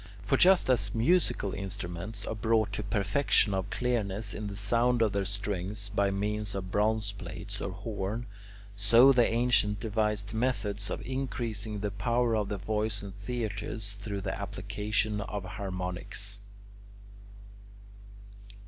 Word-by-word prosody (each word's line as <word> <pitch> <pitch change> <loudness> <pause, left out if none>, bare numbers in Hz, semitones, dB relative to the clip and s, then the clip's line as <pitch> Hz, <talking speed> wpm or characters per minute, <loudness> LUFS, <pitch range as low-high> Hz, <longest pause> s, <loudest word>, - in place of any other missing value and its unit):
For - - +3
just 185 +1 +6
as 110 -5 +2
musical 120 - +2
instruments 95 0 -4
are - - -2
brought 110 -1 +1
to 105 - -1
perfection 100 +2 +2
of 95 -1 -1
clearness 110 -4 -1
in 105 -1 -4
the 100 -1 -6
sound 115 +3 +2
of 110 - +2
their 100 -1 0
strings 100 0 -2
by 100 -1 +2
means 105 +1 -1
of 95 -1 -4
bronze 105 0 +1
plates 100 - -7
or - - -2
horn 100 +2 -3
[Greek: 120 - -9
echeia], 100 - -17 0.4
so 115 +7 +7
the 125 -4 +4
ancients 115 -3 +3
devised 105 -1 0
methods 105 -4 -1
of - - -4
increasing 115 -5 -3
the 105 -1 -1
power 115 +4 +1
of 105 -2 0
the 105 - -2
voice 105 +1 -1
in 100 - -6
theatres 105 -1 -4
through 100 -1 -5
the 95 -1 -2
application 105 +2 -1
of 100 -1 -4
harmonics. 95 +1 -4
105 Hz, 145 wpm, -30 LUFS, 100-110 Hz, 0.4 s, so